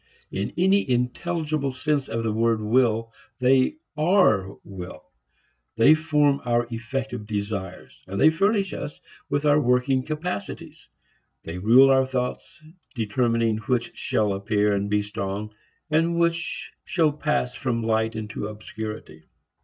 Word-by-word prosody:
In 100 Hz, +2 st, -3 dB
any 190 Hz, -2 st, +3 dB
intelligible 150 Hz, +4 st, -1 dB
sense 140 Hz, +1 st, -1 dB
of 115 Hz, 0 st, -2 dB
the 110 Hz, -2 st, -1 dB
word 115 Hz, 0 st, +2 dB
will, 115 Hz, 0 st, +1 dB, 0.2 s
they 130 Hz, -, +3 dB, 0.2 s
are 150 Hz, -, +3 dB
will. 90 Hz, -5 st, -10 dB, 0.6 s
They 115 Hz, +7 st, +6 dB
form 150 Hz, -3 st, +2 dB
our 120 Hz, -1 st, +1 dB
effective 115 Hz, -1 st, -4 dB
desires 100 Hz, -3 st, -5 dB
and 100 Hz, +1 st, -4 dB
they 155 Hz, -, +6 dB
furnish 195 Hz, +3 st, +1 dB
us 145 Hz, -, -6 dB, 0.3 s
with 145 Hz, +1 st, 0 dB
our 150 Hz, 0 st, +4 dB
working 125 Hz, +1 st, +2 dB
capacities. 155 Hz, -, -5 dB, 0.5 s
They 85 Hz, +2 st, -6 dB
rule 125 Hz, +7 st, +6 dB
our 130 Hz, 0 st, +4 dB
thoughts, 125 Hz, +3 st, -4 dB, 0.3 s
determining 115 Hz, 0 st, +1 dB
which 120 Hz, 0 st, -2 dB
shall 105 Hz, -2 st, 0 dB
appear 105 Hz, +1 st, +1 dB
and 100 Hz, 0 st, -1 dB
be 105 Hz, 0 st, +1 dB
strong 105 Hz, 0 st, -5 dB, 0.4 s
and 165 Hz, +2 st, +2 dB
which 170 Hz, 0 st, -1 dB
shall 160 Hz, -4 st, +2 dB
pass 150 Hz, -4 st, -1 dB
from 120 Hz, -4 st, -2 dB
light 110 Hz, 0 st, 0 dB
into 105 Hz, -1 st, -5 dB
obscurity. 105 Hz, -6 st, -8 dB
120 Hz, 130 wpm, -24 LUFS, 105-150 Hz, 0.6 s, They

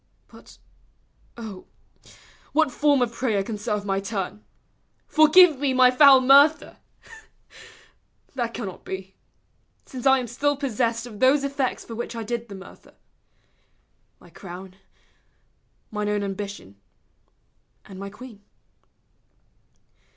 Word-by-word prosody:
But, -, -, -17 dB, 0.8 s
O, 215 Hz, -5 st, -9 dB, 0.9 s
what 315 Hz, -3 st, +2 dB
form 285 Hz, 0 st, +2 dB
of 235 Hz, -, -3 dB
prayer 220 Hz, -6 st, -1 dB
Can 210 Hz, +1 st, -6 dB
serve 210 Hz, 0 st, -3 dB
my 195 Hz, -1 st, -1 dB
turn? 200 Hz, +1 st, -5 dB, 0.3 s
" -, -, -45 dB
Forgive 310 Hz, -1 st, +6 dB
me 275 Hz, -2 st, 0 dB
my 255 Hz, -1 st, +6 dB
foul 270 Hz, 0 st, +7 dB
mur 275 Hz, +3 st, +8 dB
der?" -, -, -15 dB, 1.6 s
That 240 Hz, -3 st, -3 dB
cannot 200 Hz, -6 st, -7 dB
be: 190 Hz, 0 st, -7 dB, 0.7 s
since 260 Hz, 0 st, -4 dB
I 265 Hz, 0 st, +6 dB
am 255 Hz, -, -3 dB
still 280 Hz, +5 st, -1 dB
possessed 235 Hz, -3 st, -2 dB
Of 215 Hz, -4 st, -11 dB
those 270 Hz, +2 st, +3 dB
effects 275 Hz, -2 st, -2 dB
for 230 Hz, -, -9 dB
which 235 Hz, +1 st, -6 dB
I 230 Hz, -, -5 dB
did 235 Hz, +1 st, -5 dB
the 200 Hz, -, -8 dB
murder, 190 Hz, 0 st, -15 dB, 1.2 s
My -, -, -19 dB
crown, 185 Hz, 0 st, -11 dB, 1.2 s
mine 210 Hz, -1 st, -3 dB
own 205 Hz, -1 st, -1 dB
ambition 195 Hz, -, -7 dB, 1.1 s
and 190 Hz, -1 st, -12 dB
my 200 Hz, 0 st, -6 dB
queen. 215 Hz, 0 st, -13 dB
235 Hz, 125 wpm, -24 LUFS, 200-265 Hz, 1.6 s, mur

